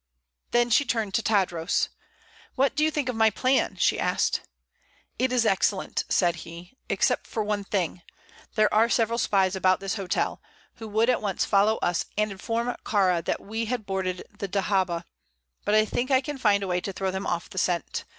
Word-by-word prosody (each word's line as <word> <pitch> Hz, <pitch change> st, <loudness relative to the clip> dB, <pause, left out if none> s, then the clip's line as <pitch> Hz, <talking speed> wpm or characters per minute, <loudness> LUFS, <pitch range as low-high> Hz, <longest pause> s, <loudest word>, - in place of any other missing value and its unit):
Then 240 Hz, 0 st, +2 dB
she 285 Hz, -, +5 dB
turned 225 Hz, -7 st, -2 dB
to 230 Hz, -, +2 dB
Tadros. 185 Hz, -7 st, +1 dB, 0.7 s
"What 270 Hz, +1 st, +2 dB
do 300 Hz, -, +2 dB
you 310 Hz, -, +4 dB
think 295 Hz, -4 st, -2 dB
of 250 Hz, -, -2 dB
my 220 Hz, 0 st, +5 dB
plan?" 255 Hz, +5 st, +1 dB
she -, -, +2 dB
asked. -, -, +1 dB, 0.8 s
"It 255 Hz, 0 st, +1 dB
is 245 Hz, -2 st, +2 dB
excellent," 195 Hz, -1 st, +1 dB
said 175 Hz, -3 st, +2 dB
he, 170 Hz, +6 st, -11 dB
"except -, -, +1 dB
for 220 Hz, -, -2 dB
one 205 Hz, -1 st, -1 dB
thing; 185 Hz, -3 st, -2 dB, 0.5 s
there 215 Hz, -1 st, +3 dB
are 225 Hz, +2 st, +4 dB
several 230 Hz, 0 st, +1 dB
spies 195 Hz, -3 st, +2 dB
about 185 Hz, -1 st, +3 dB
this 195 Hz, +2 st, -3 dB
hotel, 190 Hz, -3 st, -1 dB, 0.4 s
who 225 Hz, -, -8 dB
would 220 Hz, +3 st, +2 dB
at 245 Hz, -, 0 dB
once 200 Hz, -3 st, -1 dB
follow 210 Hz, +2 st, +3 dB
us 175 Hz, -1 st, 0 dB
and 210 Hz, 0 st, +1 dB
inform 230 Hz, +5 st, -2 dB
Kāra 185 Hz, -5 st, +2 dB
that -, -, -1 dB
we 225 Hz, +3 st, -3 dB
had 230 Hz, -1 st, -3 dB
boarded 190 Hz, -2 st, -2 dB, 0.2 s
the 200 Hz, -, -3 dB
dahabeah; 190 Hz, -3 st, 0 dB, 0.6 s
but 210 Hz, -, +2 dB
I 215 Hz, 0 st, +5 dB
think 245 Hz, +4 st, -2 dB
I 260 Hz, -1 st, +5 dB
can 290 Hz, 0 st, -6 dB
find 205 Hz, -4 st, +3 dB
a -, -, -3 dB
way 180 Hz, 0 st, 0 dB
to 195 Hz, -, -5 dB
throw 190 Hz, 0 st, -2 dB
them 190 Hz, +1 st, -4 dB
off 170 Hz, -, -3 dB
the 185 Hz, -, -2 dB
scent. 175 Hz, -3 st, -1 dB
205 Hz, 195 wpm, -26 LUFS, 190-230 Hz, 0.8 s, she